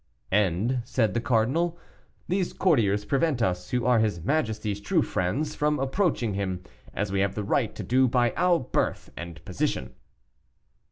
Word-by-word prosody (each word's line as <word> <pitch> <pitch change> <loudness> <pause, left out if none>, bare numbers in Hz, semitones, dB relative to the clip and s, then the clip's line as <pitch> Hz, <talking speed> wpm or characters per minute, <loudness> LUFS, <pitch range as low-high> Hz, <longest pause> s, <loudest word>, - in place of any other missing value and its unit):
"And," 105 +6 +1
said 115 -4 0
the 120 - 0
cardinal, 135 +8 +1 0.5
"these 185 0 0
courtiers 105 - +2
prevent 140 +2 +1
us, 90 -5 -1
who 125 -2 0
are 125 -2 +4
his 105 -6 +1
majesty's 110 - -1
true 100 - +2
friends, 130 +13 -1
from 150 0 +1
approaching 135 - 0
him 95 -2 -3 0.3
as 100 -1 -2
we 100 - 0
have 100 0 +1
the 105 - -2
right - - 0
to - - -5
do 130 +2 +3
by 120 -2 +2
our 180 -1 +3
birth 130 - -2
and 85 0 -8
position." - - -2
115 Hz, 160 wpm, -26 LUFS, 100-135 Hz, 0.5 s, are